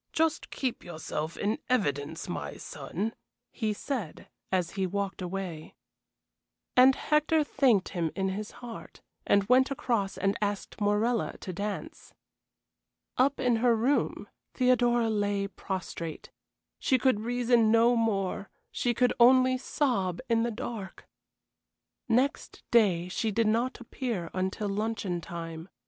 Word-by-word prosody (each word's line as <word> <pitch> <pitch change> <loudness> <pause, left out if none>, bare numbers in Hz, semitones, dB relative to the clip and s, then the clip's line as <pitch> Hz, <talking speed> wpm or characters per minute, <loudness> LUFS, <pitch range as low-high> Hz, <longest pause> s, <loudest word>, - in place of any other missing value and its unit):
Just 320 0 +1
keep 260 -3 -3
yourself 160 -1 -5
in 210 +2 -1
evidence, 145 - 0
my - - -5
son," 215 +5 -4 0.4
he 220 -3 -1
said, 210 - -4 0.2
as 180 -3 +1
he 190 -1 -1
walked 200 +1 -3
away. 180 -3 -5 1.0
And 260 +1 +7
Hector 305 +1 +2
thanked 260 -9 +2
him 170 -4 -1
in 190 -1 0
his 205 +2 -4 0.2
heart, 230 -2 -9 0.3
and 200 - +4
went 255 +6 +4
across 230 -7 -1
and 195 0 +1
asked 205 +1 -3
Morella 210 +3 +1
to 185 - -5
dance. 205 +3 -5 1.0
Up 275 +3 +3
in 245 -2 +2
her 235 0 +4
room 250 +6 0 0.3
Theodora 245 -2 +3
lay 205 -1 0
prostrate. 185 -4 -6 0.5
She 260 - +3
could 255 -4 +2
reason 240 0 +2
no 230 +2 +5
more 200 -4 0 0.2
she 240 -1 0
could 250 +1 +3
only 255 +1 +6
sob 240 - 0
in 230 -1 +2
the 235 - +1
dark. 220 -3 -6 1.0
Next 255 +5 0
day 190 -7 +4
she 220 +4 -1
did 225 +2 +1
not 235 +4 +1
appear 235 -7 -4
until 190 +3 -2
luncheon 200 -3 -2
time. 165 +1 -7
220 Hz, 130 wpm, -29 LUFS, 190-245 Hz, 1.0 s, And